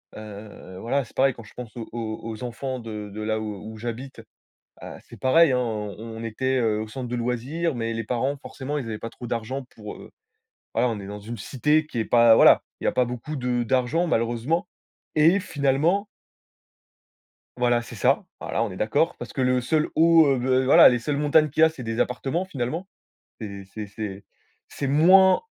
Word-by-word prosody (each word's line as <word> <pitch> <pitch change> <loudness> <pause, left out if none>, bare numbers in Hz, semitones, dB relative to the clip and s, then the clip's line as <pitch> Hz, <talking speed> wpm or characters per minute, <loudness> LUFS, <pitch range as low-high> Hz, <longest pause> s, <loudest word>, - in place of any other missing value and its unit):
Heu, 105 -3 -10
voilà 135 +5 0
c'est 115 - -17
pareil 135 -1 +3
quand 115 - -12
je - - -16
pense 125 -2 -9
aux 115 -2 -7
aux 110 -2 -5
aux 115 +1 -6
enfants 130 +2 -4
de 105 -2 -7
de 110 - -7
là 110 0 -1
où 105 +1 -6
où - - -10
j'habite, 120 +2 -6 0.6
bah, - - -9
c'est - - -14
pareil 150 +2 +5
hein, 125 - +2
on 105 -4 -3
on 115 0 -7
était, 130 +4 -1
heu, 110 -3 +1
au 110 - -5
centre 125 +1 -6
de 125 - -2
loisirs, 130 +7 -2
mais 115 -1 -2
les 115 -1 -3
parents 130 +5 -1
forcément 145 +2 -5
ils 125 - -5
avaient 110 -1 -4
pas 115 - -6
trop 120 - -9
d'argent 120 +3 -3
pour, 105 -1 -8
heu, - - -13 0.6
voilà 125 - +2
on 115 -3 -2
est 95 - -8
dans 105 0 -7
une 115 +3 -7
cité 150 +4 +1
qui 120 -6 -5
est 110 - 0
pas 115 -1 +6
voilà, - - +7 0.2
il - - -7
y - - +2
a - - +3
pas 125 - +3
beaucoup 125 +5 -6
de 125 -2 -1
d'argent 130 +9 +1
malheureusement, 120 +8 0 0.5
et 165 +6 +5
finalement 160 +5 +1 1.5
Voilà 120 -1 +2
c'est - - -10
ça. - - +2
Voilà 115 - -1
on 105 - -3
est 95 - -8
d'accord, 145 +10 +1
parce - - -8
que 135 - -2
le 125 0 +2
seul 155 +5 +1
haut, 165 0 +6
heu, 135 -2 +3 0.2
v 130 - 0
voilà 135 - +8
les 120 -1 +1
seules 140 +4 -2
montagnes 150 +1 +3
qu'il 155 - -1
y - - +9
a - - +4
c'est 140 -6 -9
des 115 0 -3
appartements 135 +8 -1
finalement. 160 +4 -4 0.5
C'est 100 -3 -7
c'est 105 -2 -6
c'est 100 -1 -7 0.4
c'est 140 - -4
moins 185 - +6
125 Hz, 210 wpm, -24 LUFS, 110-145 Hz, 1.5 s, y